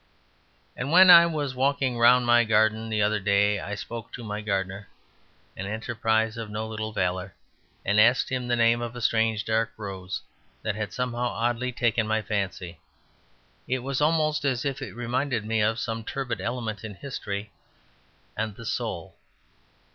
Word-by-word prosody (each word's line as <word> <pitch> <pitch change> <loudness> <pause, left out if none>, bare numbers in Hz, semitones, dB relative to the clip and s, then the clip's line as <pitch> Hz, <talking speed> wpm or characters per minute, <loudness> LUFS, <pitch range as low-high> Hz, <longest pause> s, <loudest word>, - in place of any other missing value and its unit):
And 135 +4 -4
when 185 +2 +9
I 170 -1 +9
was 150 -5 -2
walking 135 -1 +1
round 120 +1 +5
my 120 0 +5
garden 110 0 +2
the 110 -1 +1
other 105 +1 +1
day 100 +1 +2
I 100 +3 -5
spoke 115 +2 -7
to 125 - -7
my 105 -1 -4
gardener 95 -1 -3 0.7
(an 95 - -5
enterprise 110 +1 -1
of 115 -2 -5
no 110 +1 -4
little 110 0 -4
valour) 90 -1 -2 0.5
and 105 +2 +3
asked 120 +4 +4
him 130 -2 -2
the 120 - +2
name 115 0 +3
of 120 0 -5
a - - -5
strange 110 -1 +1
dark 110 0 0
rose 95 -3 -6 0.4
that 110 - -1
had 105 0 -4
somehow 125 -1 -2
oddly 120 +1 -1
taken 115 -2 +1
my 110 0 0
fancy. 95 -5 -3 0.9
It 130 -1 -1
was 135 +1 -2
almost 155 0 +2
as 135 -2 0
if 140 -2 -2
it - - -7
reminded 120 -1 -1
me 110 0 0
of 110 +2 +1
some 115 -1 -3
turbid 130 -5 -4
element 115 0 -4
in 105 -3 -7
history 100 -4 -5 0.8
and 110 -1 -3
the 115 - -10
soul. - - -3
110 Hz, 170 wpm, -26 LUFS, 105-125 Hz, 0.9 s, when